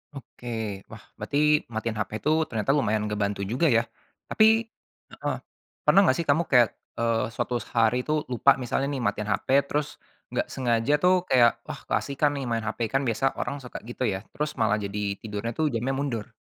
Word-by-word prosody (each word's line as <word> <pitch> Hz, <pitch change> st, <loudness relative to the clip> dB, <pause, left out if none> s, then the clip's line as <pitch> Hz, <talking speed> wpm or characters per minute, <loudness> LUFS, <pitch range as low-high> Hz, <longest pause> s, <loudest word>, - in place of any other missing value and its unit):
Oke, 125 Hz, -2 st, -11 dB, 0.4 s
wah -, -, -12 dB, 0.2 s
berarti 150 Hz, +1 st, +2 dB
matiin 110 Hz, 0 st, -3 dB
HP 105 Hz, -, -2 dB
tuh 155 Hz, +1 st, +3 dB
ternyata 110 Hz, +3 st, 0 dB
lumayan 110 Hz, -7 st, +1 dB
ngebantu 100 Hz, -1 st, -1 dB
juga, 125 Hz, -, +1 dB
ya? 115 Hz, -5 st, +4 dB, 0.5 s
Tapi 220 Hz, +1 st, +5 dB, 0.5 s
heeh, -, -, -3 dB, 0.5 s
pernah -, -, +6 dB
nggak 130 Hz, -, +4 dB
sih 170 Hz, -, 0 dB
kamu 150 Hz, +4 st, +4 dB
kayak, 125 Hz, -4 st, +6 dB, 0.3 s
eee, 115 Hz, -1 st, +1 dB
suatu 120 Hz, +1 st, -2 dB, 0.2 s
hari 115 Hz, +1 st, +4 dB
tuh 155 Hz, 0 st, +1 dB
lupa 135 Hz, +3 st, +5 dB
misalnya 135 Hz, +3 st, -1 dB
nih 135 Hz, -, -3 dB
matiin 105 Hz, 0 st, -1 dB
HP 100 Hz, -, -2 dB, 0.2 s
terus 150 Hz, 0 st, -3 dB, 0.3 s
nggak -, -, -1 dB
sengaja 120 Hz, +1 st, +1 dB
tuh 180 Hz, +1 st, +6 dB
kayak, 120 Hz, -2 st, +5 dB, 0.2 s
"Wah, -, -, -6 dB
keasikan 140 Hz, +1 st, +1 dB
nih 140 Hz, -, -3 dB
main 115 Hz, -1 st, -1 dB
HP." 110 Hz, -, -4 dB
Kan 135 Hz, -, +3 dB
biasa 135 Hz, +4 st, 0 dB
orang -, -, -2 dB
suka 125 Hz, -, -7 dB
gitu 120 Hz, +3 st, -5 dB
ya, 95 Hz, -3 st, -1 dB
terus 150 Hz, 0 st, -2 dB
malah 105 Hz, -, +3 dB
jadi 100 Hz, 0 st, -4 dB, 0.2 s
tidurnya 105 Hz, +1 st, -4 dB
tuh 160 Hz, -, +1 dB
jamnya 120 Hz, +4 st, -1 dB
mundur. 130 Hz, -6 st, -2 dB
120 Hz, 185 wpm, -26 LUFS, 110-140 Hz, 0.5 s, pernah